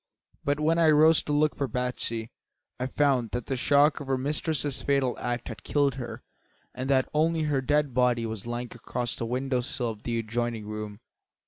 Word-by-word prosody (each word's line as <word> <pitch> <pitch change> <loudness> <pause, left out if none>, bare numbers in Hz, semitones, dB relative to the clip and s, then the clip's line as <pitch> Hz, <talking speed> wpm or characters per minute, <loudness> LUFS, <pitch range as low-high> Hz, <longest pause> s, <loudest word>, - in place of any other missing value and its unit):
But 145 +1 0
when 160 +2 +2
I 165 -1 +5
rose 155 +1 +6
to - - -5
look 150 +1 +2
for 140 - -1
Batsy 125 -3 -2 0.5
I 130 - -1
found 130 -4 +2
that 120 -1 -2
the 135 - -2
shock 145 +4 +4
of 145 - -7
her 135 -1 +1
mistress's 145 +1 -1
fatal 140 -3 +1
act 120 -1 -3
had 115 - -8
killed 145 -2 +2
her 125 -2 -7 0.5
and 130 +2 -4
that 130 -2 +3
only 160 +1 +2
her 145 -3 +1
dead 145 0 +1
body 125 -2 +2
was 110 -1 -5
lying 120 +1 -3
across 120 0 -3
the 115 - -3
window 130 +1 0
sill 125 -1 -2
of 105 -1 -11
the 115 0 -2
adjoining 115 0 -2
room. 105 0 -6
130 Hz, 195 wpm, -27 LUFS, 120-145 Hz, 0.5 s, rose